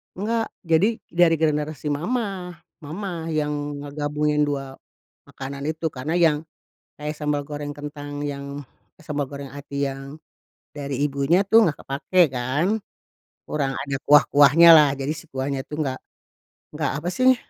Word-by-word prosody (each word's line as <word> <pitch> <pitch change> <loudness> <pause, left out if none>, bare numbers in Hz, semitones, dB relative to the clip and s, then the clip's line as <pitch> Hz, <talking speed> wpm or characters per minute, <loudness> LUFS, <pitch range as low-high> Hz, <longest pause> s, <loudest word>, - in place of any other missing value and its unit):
Enggak. 225 +4 -1
Jadi, 185 +6 +2
dari 170 -1 +4
generasi 150 -1 0
mamah. 185 - -2 0.3
Mamah 170 +2 -5
yang 145 -1 -2
ngegabungin 150 +1 0
2 135 -2 -4 0.5
makanan 140 +1 -7
itu 160 +1 -1
karena 145 +3 -4
yang 160 -3 +4 0.6
kayak 150 +1 -4
sambal 150 -1 -1
goreng 145 0 -5
kentang 145 0 -6
yang, 140 -1 -5 0.5
eh, 160 - -18
sambal 145 -2 -2
goreng 140 -2 -8
hati 140 0 -3
yang 135 +2 -7 0.6
dari 140 -2 -4
ibunya 145 +7 +2
tuh 225 +3 +6
enggak 150 - -2
kepakai 145 +7 +1
kan. 130 +7 0 0.8
Kurang 140 -3 -1
ada 140 -1 -3
kuah-kuahnyalah 150 +1 +7
jadi 135 +1 -3
si 155 - -10
kuahnya 135 0 -3
tuh 150 +2 -4
enggak, 130 -3 -2 0.8
enggak 150 -1 -1
apa 155 +4 -3
sih, 255 +3 +4
150 Hz, 135 wpm, -23 LUFS, 140-160 Hz, 0.8 s, kuah-kuahnyalah